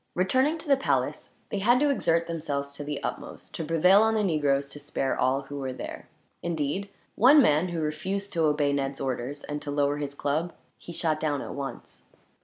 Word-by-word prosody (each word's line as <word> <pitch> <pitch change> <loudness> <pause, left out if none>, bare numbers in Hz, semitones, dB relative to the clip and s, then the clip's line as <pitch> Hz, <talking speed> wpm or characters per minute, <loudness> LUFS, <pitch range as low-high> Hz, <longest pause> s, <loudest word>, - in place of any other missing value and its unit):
Returning 260 - +2
to 320 - -11
the 275 -1 +5
palace, 270 - -1
they 205 - -2
had 240 +5 +4
to 290 0 +3
exert 170 -10 +1
themselves 145 -4 -3
to 145 - -6
the 145 0 -4
utmost - - -6
to - - -4
prevail 165 +5 +5
on 220 0 +3
the 215 - +2
negroes 145 -6 +1
to 145 - -8
spare 140 -2 -2
all 130 +2 +1
who 140 +1 -7
were 130 -1 -3
there. - - -7 0.3
Indeed, 170 +4 -2 0.2
one 270 +7 +7
man, 160 - +4
who 175 -2 -3
refused 190 +7 -3
to 165 -2 +2
obey 150 -1 +2
Ned's 135 -1 -2
orders 135 +2 -3
and 150 0 -5
to 150 - -6
lower 145 0 +1
his 145 -1 -4
club, 155 +5 -1 0.3
he - - -10
shot 160 -2 0
down 145 -3 -1
at - - -6
once. 140 -1 -7
155 Hz, 205 wpm, -27 LUFS, 140-190 Hz, 0.3 s, one